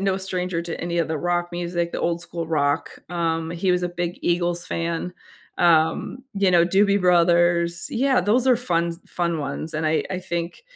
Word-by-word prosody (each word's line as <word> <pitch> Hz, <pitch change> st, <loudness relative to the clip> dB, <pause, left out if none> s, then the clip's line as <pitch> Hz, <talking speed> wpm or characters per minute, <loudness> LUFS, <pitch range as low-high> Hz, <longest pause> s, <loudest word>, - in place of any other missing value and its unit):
no 195 Hz, -1 st, +1 dB
stranger 185 Hz, -2 st, -3 dB
to 170 Hz, -1 st, -5 dB
any 170 Hz, 0 st, -2 dB
of 165 Hz, -, +1 dB
the 160 Hz, -1 st, -2 dB
rock 175 Hz, +1 st, 0 dB
music, 175 Hz, 0 st, -2 dB
the -, -, -3 dB
old 170 Hz, 0 st, 0 dB
school 170 Hz, -1 st, -6 dB
rock, 145 Hz, -1 st, 0 dB, 0.2 s
um, 165 Hz, -2 st, -1 dB
he 175 Hz, +2 st, 0 dB
was 180 Hz, 0 st, 0 dB
a 175 Hz, -, 0 dB
big 175 Hz, 0 st, -4 dB
Eagles 175 Hz, 0 st, 0 dB
fan, 170 Hz, +1 st, -3 dB, 0.5 s
um, 165 Hz, +7 st, +2 dB, 0.2 s
you 195 Hz, -1 st, +2 dB
know, 170 Hz, -1 st, +5 dB
Doobie 200 Hz, +3 st, +3 dB
Brothers, 175 Hz, -1 st, +3 dB
yeah, 265 Hz, +2 st, +2 dB
those 220 Hz, +7 st, +2 dB
are 255 Hz, -2 st, +5 dB
funs 170 Hz, -7 st, -1 dB
fun 170 Hz, -2 st, -1 dB
ones, 145 Hz, +2 st, -4 dB
and 155 Hz, +1 st, -1 dB
I 155 Hz, 0 st, +1 dB
I 185 Hz, -, -2 dB
think, 175 Hz, -, -4 dB
175 Hz, 190 wpm, -23 LUFS, 170-180 Hz, 0.5 s, know